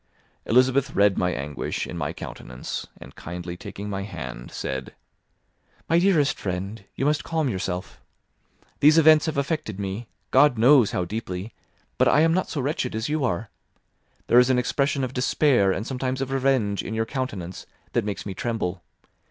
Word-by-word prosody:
Elizabeth 130 +3 +3
read 100 -1 +4
my 90 - +1
anguish 70 -3 -3
in - - -7
my - - -2
countenance, 60 +1 -7
and - - -12
kindly 85 +1 -6
taking 100 +3 -8
my 100 -1 -3
hand, 65 - -7
said, 65 0 -5 0.9
"My 165 - +4
dearest 170 -6 +3
friend, 100 +3 -4
you 135 - -1
must 150 0 +1
calm 160 -4 0
yourself. 95 -3 -4 0.8
These 150 +2 +6
events 155 0 +6
have 155 - -2
affected 140 - -2
me, 100 +4 -4 0.2
God 145 -5 +5
knows 125 -1 +6
how 90 - -1
deeply; 100 0 -5 0.5
but - - +5
I 150 - +5
am 165 0 +4
not 185 +1 0
so 145 - -2
wretched 130 -3 -2
as 110 +5 -2
you 155 -1 0
are. 105 -2 -1 0.7
There 120 - +6
is 125 +1 +4
an 130 - +3
expression 140 +3 0
of 130 -1 -3
despair, 125 -5 +3
and 100 +3 -2
sometimes 130 0 -2
of 135 0 -3
revenge, 130 -7 +1
in 110 - -5
your 110 0 0
countenance 105 -9 -5 0.3
that - - +2
makes 105 -1 -4
me 100 - -4
tremble. 95 -4 -3
120 Hz, 170 wpm, -25 LUFS, 95-140 Hz, 0.9 s, These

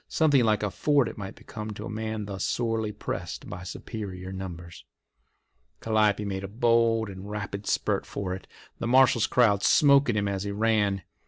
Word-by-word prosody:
Something 145 -5 +3
like 105 -1 +2
a 105 - -1
fort 145 +4 +2
it - - -6
might 95 -2 -7
become 110 0 -7
to - - -7
a - - -6
man 110 -1 -3
thus 100 -2 -5
sorely 115 -3 -1
pressed 105 - -5
by 90 - -7
superior 95 -1 -7
numbers. 85 -3 -8 1.0
Calliope 105 -2 +2
made 95 -1 -3
a - - -4
bold 115 +1 +2
and 95 +1 -8
rapid 105 -1 -5
spurt - - 0
for 95 -2 -4
it, 95 - -8 0.3
the 115 - -2
marshal's 125 -2 +5
crowd 105 -5 +3
"smoking" 140 -1 +5
him 100 -1 +1
as 100 -1 -2
he 100 - -3
ran. 105 -2 +1
105 Hz, 175 wpm, -27 LUFS, 100-115 Hz, 1.0 s, marshal's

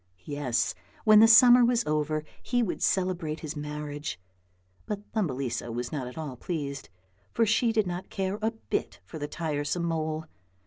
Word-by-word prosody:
Yes, 145 -8 -1 0.3
when 215 -1 +8
the 225 - +8
summer 245 +2 +8
was 240 0 +2
over 155 0 0 0.2
he 245 -1 +1
would 205 - -3
celebrate 175 -5 0
his 155 0 -5
marriage; 150 -4 -5 0.7
but 210 -1 -4
Thumbelisa 130 - -2
was 120 +1 -4
not 135 -5 -3
at 125 - -10
all 150 -5 -5
pleased, 140 - -4 0.5
for 230 - +4
she 225 +2 +2
did 220 -2 +2
not 180 +1 -5
care 195 +1 -2
a 220 - +2
bit 225 -1 -4
for 160 - -8
the 145 - -3
tiresome 150 +1 -2
mole. 160 -1 -2
160 Hz, 165 wpm, -28 LUFS, 145-210 Hz, 0.7 s, when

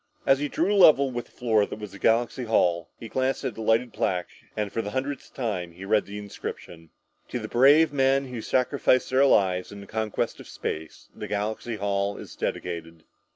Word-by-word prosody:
As 135 0 +4
he 145 - -1
drew 180 +8 +1
level 145 -8 +6
with 120 -1 -4
the - - -25
floor 110 -4 +2
that - - -7
was 105 -2 -8
Galaxy 120 +4 +1
Hall, 85 -7 +2
he 115 - -7
glanced 130 +4 -1
at 130 -4 -2
the 110 - -8
lighted 115 +1 +1
plaque 90 -2 -1 0.3
and 105 -2 -1
for 115 - 0
the 105 - -5
hundredth 135 +4 -4
time 95 -9 -3
reread 100 +3 +1
the 100 +1 -7
inscription 85 -5 -8 0.2
"... - - -45
to - - -3
the - - -5
brave 145 +5 +5
men 135 0 +3
who 120 -3 -5
sacrificed 130 +1 +1
their 135 +2 +5
lives 90 -6 +2
in 100 - -9
the 100 - -10
conquest 110 +1 -2
of - - -11
space, 80 0 -6
this 105 - -7
Galaxy 110 +3 -2
Hall 100 0 -1
is - - -10
dedicated...." 85 -2 -4
110 Hz, 200 wpm, -26 LUFS, 100-130 Hz, 0.3 s, level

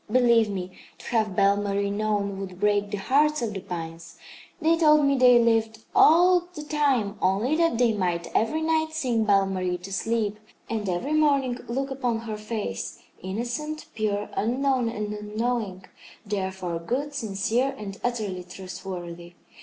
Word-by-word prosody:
Believe 235 -3 +4
me, 185 -2 -4 0.3
to - - -14
have 215 -5 0
Belle 200 +1 +4
Marie 200 0 -1
known 205 -1 -1
would 185 -2 -7
break 205 0 +2
the 205 - -3
hearts 285 +7 +2
of 220 -2 -2
the 195 - -4
pines. 165 -2 -7 0.4
They 325 0 +3
told 305 -3 +5
me 280 0 +3
they 250 -2 +6
lived 225 -1 +2
all 350 +2 +6
the 300 - -6
time 270 -9 0
only 205 +10 +2
that 330 -7 +2
they 240 -2 +3
might 175 -4 -1
every 310 +9 +1
night 315 0 +1
sing 250 -8 0
Belle 200 -2 +4
Marie 185 -2 -2
to 185 +2 -9
sleep, 215 0 -1 0.3
and 215 -3 -2
every 210 +12 -1
morning 280 -5 +2
look 270 +3 -2
upon 245 -4 -1
her 225 -2 -5
face, 210 - -5 0.2
innocent, 245 - -4
pure, 210 -1 -1
unknown 255 +1 +1
and 210 -2 -4
unknowing, 210 -2 -3 0.4
therefore 190 -4 -3
good, 265 +12 -3
sincere 235 +2 0
and 195 -2 -7
utterly 215 -7 -2
trustworthy. 180 -1 -8
215 Hz, 155 wpm, -26 LUFS, 195-260 Hz, 0.4 s, they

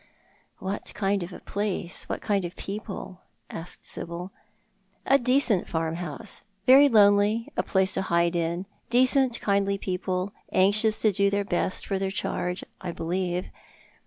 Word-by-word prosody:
" - - -37
What 195 +2 -5
kind 200 -1 +1
of 175 +2 -5
a - - -10
place— 200 -3 -3
what - - -3
kind 200 -3 +1
of 175 0 -5
people? 195 -2 -6
" - - -46
asked 165 +2 -8
Sibyl. 175 +3 -6 0.7
"A 275 +1 +5
decent 250 -5 +2
farmhouse; 165 +4 -3 0.2
very 275 +3 +8
lonely, 210 0 +4
a - - +2
place 190 -1 +1
to 190 - 0
hide 170 -1 +1
in 170 +2 -1 0.2
decent 255 0 +3
kindly 200 -1 +1
people, 185 +1 -2 0.2
anxious 210 +3 +4
to 215 - +5
do 200 +1 +2
their 200 0 0
best 185 0 -1
for 195 -2 -1
their 195 0 -1
charge, 180 -2 -2 0.2
I 180 - -4
believe. 180 +2 -2
195 Hz, 155 wpm, -26 LUFS, 180-210 Hz, 0.7 s, very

